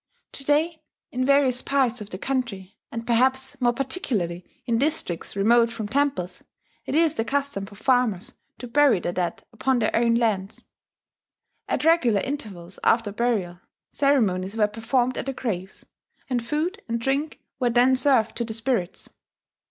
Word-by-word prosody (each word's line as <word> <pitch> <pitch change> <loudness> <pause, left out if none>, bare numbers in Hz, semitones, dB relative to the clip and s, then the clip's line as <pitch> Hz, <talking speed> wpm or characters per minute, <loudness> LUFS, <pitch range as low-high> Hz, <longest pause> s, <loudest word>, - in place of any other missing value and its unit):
To 275 - -2
day, 310 +3 +1 0.3
in 255 +1 -1
various 275 -3 +4
parts 255 -4 +1
of 210 - -8
the 185 - -5
country, 225 -6 -3 0.2
and 230 0 -5
perhaps 260 +3 +1
more 240 -1 +4
particularly 235 - -2 0.2
in 230 -1 +1
districts 280 - -2
remote 230 +4 +4
from 225 -2 -5
temples, 245 -8 -1 0.4
it - - -2
is 320 -1 +4
the 225 - -1
custom 275 -6 -2
for 205 - -13
farmers 240 -4 +1 0.2
to 245 - -8
bury 270 -4 +4
their 175 - -2
dead 175 -1 -3
upon 250 +4 +1
their 220 -3 0
own 230 0 +3
lands. 215 -4 -1 1.0
At - - -1
regular 250 - +4
intervals 200 -11 -6
after 225 -3 +3
burial, 200 -6 -1 0.3
ceremonies 215 -8 +1
were 215 - +4
performed 240 +4 0
at - - -5
the 270 - -1
graves; 195 -7 -5 0.4
and 245 -3 -1
food 310 - -2
and 235 0 -1
drink 275 +5 -1 0.2
were 250 -2 +2
then 245 +2 +4
served 255 -4 +3
to 235 - -1
the 220 -1 -4
spirits. 225 -6 -2
235 Hz, 160 wpm, -24 LUFS, 210-270 Hz, 1.0 s, various